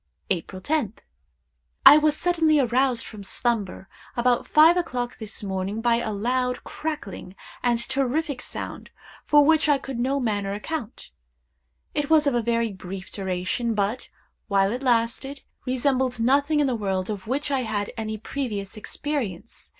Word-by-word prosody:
"April 185 +1 -2
10th. 235 -2 -1 0.9
I 295 - +11
was 305 0 +2
suddenly 325 -4 +3
aroused 250 -1 +2
from 210 -3 -9
slumber, 205 -2 -2 0.3
about 240 0 +2
five 315 +3 +7
o'clock 250 -9 -2
this 220 -1 -5
morning, 195 +2 -3
by 230 0 +3
a 225 -2 -2
loud, 250 +4 -1
crackling, 295 -12 -6 0.3
and 240 -1 +2
terrific 270 +3 -1
sound, - - -7 0.4
for 295 -1 +6
which 315 0 +4
I 290 - +5
could 270 -2 -6
in - - -1
no 270 +3 +1
manner 205 -5 -1
account. 235 - -6 0.8
It 295 -1 -1
was 315 -2 +5
of 280 - +2
very 230 -1 0
brief 190 0 -8
duration, 190 +4 -2
but, 210 +4 -1 0.4
while 195 -1 +2
it 245 +3 -3
lasted 255 +3 0 0.2
resembled 255 -1 +1
nothing 285 +6 +3
in 295 - +3
the 260 - +1
world 195 -2 -2
of 200 -1 -6
which 285 +4 -1
I 270 - +2
had 210 -3 -2
any 220 -1 -4
previous 210 -5 -4
experience. 230 - -5
240 Hz, 150 wpm, -25 LUFS, 205-280 Hz, 0.9 s, I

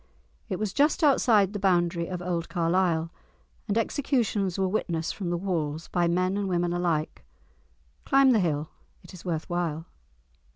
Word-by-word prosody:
It - - -2
was 210 -3 -3
just 295 +3 +2
outside 220 -8 +4
the 205 - -3
boundary 175 -3 +1
of 180 -1 -5
old 170 -2 -2
Carlisle, 170 -1 +1 0.6
and 210 0 0
executions 230 - 0
were 190 -1 +1
witnessed 170 -5 -2
from 185 -4 -4
the 175 - 0
walls, 165 -4 -3
by 175 -1 +1
men 185 +3 +1
and 200 -1 -2
women 175 -1 0
alike. 170 -3 -1 0.8
Climb 270 -1 +5
the 230 - +4
hill—it 155 +1 -5
is 180 - -11
worth 165 -4 -3
while. 165 -2 -2
180 Hz, 155 wpm, -27 LUFS, 170-200 Hz, 0.8 s, Climb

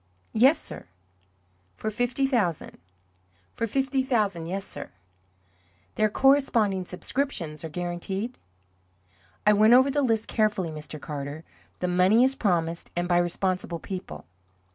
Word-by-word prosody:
"Yes, 265 +8 +5
sir." - - -8 0.9
"For 215 - -3
fifty 245 +4 0
thousand?" 210 - -1 0.7
"For 230 - -2
fifty 265 +3 0
thousand 210 -10 0
yes, 195 +3 -3
sir." - - -7 1.0
"Their 215 - +2
corresponding 230 -7 +3
subscriptions 180 - -3
are 160 - -5
guaranteed?" 180 +8 -4 1.1
"I 210 - +6
went 215 +3 +6
over 260 +2 +6
the 290 +1 +1
list 225 -4 +1
carefully, 210 -6 0
Mr. 155 0 -8
Carter. 145 +1 -6 0.4
The 180 - 0
money 185 +6 +4
is 265 +1 +3
promised, 170 -9 -1
and 175 0 -1
by 175 -1 +3
responsible 175 0 -1
people." 165 - -7
200 Hz, 125 wpm, -26 LUFS, 175-245 Hz, 1.1 s, I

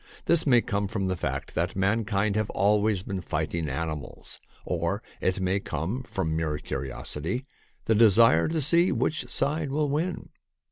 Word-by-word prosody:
This 165 -2 +3
may 120 -3 +6
come 100 -1 -1
from 95 -3 -2
the 95 - 0
fact - - -4
that - - -1
mankind 100 +1 +1
have 110 -1 0
always 105 -1 +2
been 95 -2 -4
fighting 80 -1 -2
animals, 75 0 -5 0.3
or 90 +4 -1 0.2
it 95 +1 0
may 95 +1 +1
come 95 - -3
from 95 -10 -2
mere 80 -2 -1
curiosity 75 - -4 0.2
— - - -38
the 115 - +3
desire 110 -5 +6
to 160 -1 -1
see 170 +5 +3
which 130 +5 -1
side 150 +1 -1
will 145 +1 0
win. 165 +5 -2
100 Hz, 160 wpm, -27 LUFS, 85-125 Hz, 0.3 s, may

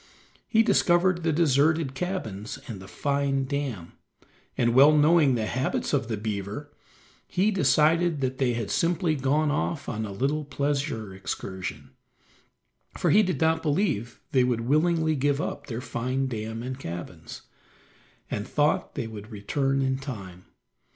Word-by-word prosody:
He 225 -1 +4
discovered 185 -4 +3
the 165 -1 +1
deserted 155 -1 +2
cabins 120 - -4
and 110 -5 -6
the 95 - -11
fine 140 +2 0
dam, 130 - -3 0.7
and 120 -1 +2
well 145 +4 +7
knowing 150 -3 +5
the 110 -2 -1
habits 130 +6 -1
of 135 -5 +1
the 110 -2 -2
beaver, 105 +6 -4 0.6
he 200 +4 +1
decided 165 -3 +3
that 130 0 -2
they 125 -3 +2
had 115 -3 -3
simply 170 -1 +1
gone 145 +2 +1
off 150 0 -2
on 110 -2 -3
a - - -7
little 140 +9 -1
pleasure 140 -7 -2
excursion, 95 0 -6 1.1
for - - +2
he 210 - +7
did 180 -9 -1
not 160 0 +2
believe 145 - -1
they 130 -2 +4
would 125 -2 0
willingly 160 +5 +2
give 140 0 +1
up 145 -3 -4
their 120 -2 -4
fine 130 +3 -2
dam 110 -1 -4
and 130 +1 -5
cabins, 85 - -7 0.9
and 105 +1 -3
thought 150 0 +1
they - - -2
would 110 -1 -8
return 135 +6 -1
in 130 0 0
time. 95 -10 -8
135 Hz, 150 wpm, -26 LUFS, 115-155 Hz, 1.1 s, well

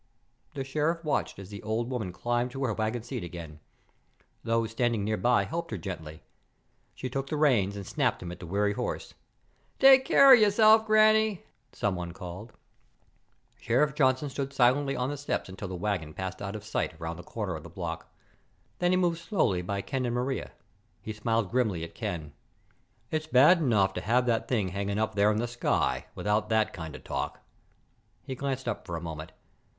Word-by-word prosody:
The 135 - -2
Sheriff 155 +5 -1
watched 150 - -1
as 100 0 -10
the 100 - -7
old 115 +3 -2
woman 110 -8 -3
climbed 120 +6 -1
to 135 - -3
her 120 -4 0
wagon 110 +2 -2
seat 120 -2 -5
again. 85 -3 -8 0.8
Those 115 -1 0
standing 115 -2 0
nearby 110 +4 +2
helped 170 +1 -4
her 110 - -3
gently. 80 -3 -7 0.7
She 130 - -4
took 135 +2 -3
the 150 - -2
reins 115 -10 +3
and 100 -1 -6
snapped - - 0
them 85 - -6
at 90 - -9
the 90 - -8
weary 100 +3 +1
horse. - - -4 0.6
"Take 270 -1 +8
care 275 0 +8
of 245 - +8
yourself, 220 +1 +5
Granny!" 215 -2 +4 0.3
someone 90 -4 -2
called. 95 +4 -8 1.1
Sheriff 135 +5 +2
Johnson 130 -1 +2
stood 140 0 -4
silently 135 +2 +3
on 125 +2 -1
the 145 - -4
steps 145 - -2
until 95 +2 -6
the 95 - -5
wagon 90 -5 -3
passed 95 0 -5
out 100 +1 -4
of 105 - -7
sight 105 - -3
around 80 0 -5
the 90 - -9
corner 100 -3 -4
of 80 - -7
the 85 - -11
block. 85 -1 -6 0.7
Then 175 - +2
he 185 - +3
moved 175 -2 +1
slowly 165 - 0
by 100 +2 -3
Ken 130 -2 -2
and 120 - -2
Maria. 130 +2 -2 0.5
He 110 - -5
smiled 110 -1 -1
grimly 110 -9 0
at 85 - -8
Ken. 85 -10 -5 0.8
"It's 155 0 -2
bad 150 +6 +6
enough 105 -10 +2
to - - -4
have 125 +3 +2
that 115 -2 0
thing 105 -7 0
hanging 100 +2 -2
up 110 0 0
there 100 +1 +4
in 105 - +1
the 120 +2 -1
sky 65 - 0
without 105 +1 0
that 110 -1 +2
kind 80 -3 -7
of - - -11
talk." - - -4 0.8
He 130 - -5
glanced 135 -1 -3
up 120 - -2
for 85 - -4
a - - -3
moment. 80 -2 -7
115 Hz, 190 wpm, -28 LUFS, 95-135 Hz, 1.1 s, Take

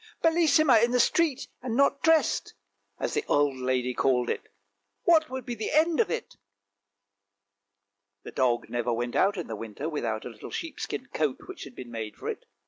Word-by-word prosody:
" - - -32
Bellissima 310 -7 +5
in 235 - +4
the 250 0 +2
street 300 +1 +2
and 250 -3 -3
not 280 0 +3
dressed! 320 -1 +2 0.2
" - - -44
as - - -2
the 435 - 0
old 145 -2 +2
lady 125 -1 0
called 125 -2 +2
it, - - -5 0.3
" 100 0 -51
what 320 -2 +5
would 260 -2 -5
be 245 - -3
the 220 -2 -3
end 315 +2 +3
of 460 - +3
it? 475 0 -4 1.0
" 100 0 -57
The - - -8
dog 120 -2 +1
never 120 +1 -1
went 120 +1 -2
out 200 +1 +3
in 175 - -3
the 110 - -5
winter 115 +7 -6
without 115 -9 -3
a - - -4
little 115 - -10
sheep 330 -2 -5
skin - - -4
coat - - 0
which 380 -1 -8
had - - -12
been 120 -2 -9
made 110 -2 -5
for - - -6
it. - - -6
145 Hz, 210 wpm, -27 LUFS, -, 1.0 s, Bellissima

